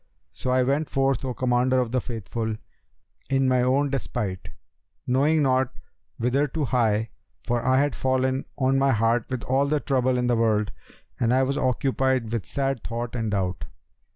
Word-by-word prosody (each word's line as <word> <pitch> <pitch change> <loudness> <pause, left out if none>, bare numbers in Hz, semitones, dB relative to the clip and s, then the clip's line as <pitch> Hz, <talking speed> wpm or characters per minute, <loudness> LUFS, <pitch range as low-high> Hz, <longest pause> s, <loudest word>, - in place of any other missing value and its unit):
So 130 - -5
I 130 0 +3
went 140 +4 0
forth, 135 -1 +1
O 130 -2 -3
Commander 130 +1 +2
of 125 -2 -1
the 130 0 +1
Faithful, 110 -1 -4 0.7
in 135 -1 +2
my 130 -1 +3
own 135 +3 +2
despite, 100 -6 -3 0.6
knowing 145 +5 +2
not 130 -1 +2 0.4
whither 130 +5 +1
to 150 +2 -2
hie, 110 -4 +1 0.3
for 120 -1 0
had 130 +3 +2
fallen 130 0 0
on 135 0 +2
my 135 0 +3
heart 115 +2 +1
all 135 +2 +1
the 150 +1 +1
trouble 130 -3 +1
in 125 - 0
the 120 -1 +2
world 110 -2 +1 0.5
and 120 -1 +2
I 130 +1 +4
was 135 +1 0
occupied 130 -2 0
with 115 -8 -3
sad 135 - -2
thought 120 0 -4
and 115 -2 -1
doubt. 95 -3 -2
130 Hz, 165 wpm, -25 LUFS, 115-135 Hz, 0.7 s, I